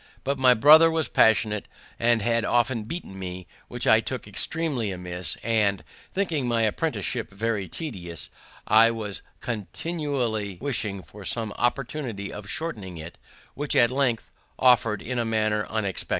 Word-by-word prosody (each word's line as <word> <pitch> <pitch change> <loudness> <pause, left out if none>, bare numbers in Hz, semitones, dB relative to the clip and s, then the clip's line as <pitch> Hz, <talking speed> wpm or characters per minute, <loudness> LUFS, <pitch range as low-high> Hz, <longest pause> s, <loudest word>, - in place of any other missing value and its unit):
But 140 0 -1
my 125 -1 +6
brother 155 +7 +8
was 160 -4 0
passionate, 110 -2 +2 0.3
and 115 -2 +2
had 115 0 +1
often 120 -2 +1
beaten 110 - -6
me, 90 -1 -6 0.2
which - - -5
I - - +6
took - - -5
extreamly 150 -10 -1
amiss; 90 -1 +1
and, 105 -4 +1 0.3
thinking 165 -9 -1
my 115 -1 +1
apprenticeship 120 0 -1
very 100 -1 -2
tedious, 85 - -6 0.3
I 115 +1 +6
was 110 -3 -4 0.2
continually 120 - -3
wishing 110 -8 -2
for 105 -1 -13
some 110 +3 -1
opportunity 120 -5 -2
of 105 0 -8
shortening 105 - -4
it, 80 +2 -10 0.3
which 145 +1 -2
at 120 0 +5
length 130 -4 0 0.2
offered 120 -4 +3
in 125 0 -3
a - - +1
manner 110 -1 0
unexpected. 105 -4 -2
115 Hz, 145 wpm, -25 LUFS, 100-130 Hz, 0.3 s, brother